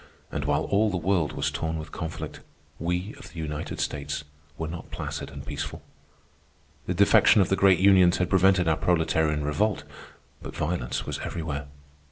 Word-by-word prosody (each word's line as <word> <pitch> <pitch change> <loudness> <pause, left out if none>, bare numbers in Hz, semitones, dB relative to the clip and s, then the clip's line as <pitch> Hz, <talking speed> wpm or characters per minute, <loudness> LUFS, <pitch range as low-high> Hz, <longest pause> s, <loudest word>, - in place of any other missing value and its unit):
And - - -3
while 75 +1 +1
all 105 +2 +2
the 95 - -1
world 85 -3 +1
was - - -1
torn 80 0 -2
with 80 0 -7
conflict, 80 -2 -6 0.4
we 90 +5 -2
of - - -11
the 85 - -14
United 75 -2 -4
States 70 0 -3 0.3
were 80 - -3
not 85 +1 -7
placid - - -5
and - - -9
peaceful. - - -5 1.0
The 90 - -1
defection 100 +2 +6
of 95 - +3
the 95 - +3
great 95 -1 +5
unions 95 -2 +5
had 90 - +1
prevented 95 -1 +4
our 80 - +3
proletarian 80 -3 +1
revolt, 100 +8 0 0.6
but - - -8
violence 75 -6 -2
was - - -4
everywhere. 75 -4 -4
85 Hz, 170 wpm, -26 LUFS, 80-95 Hz, 1.0 s, defection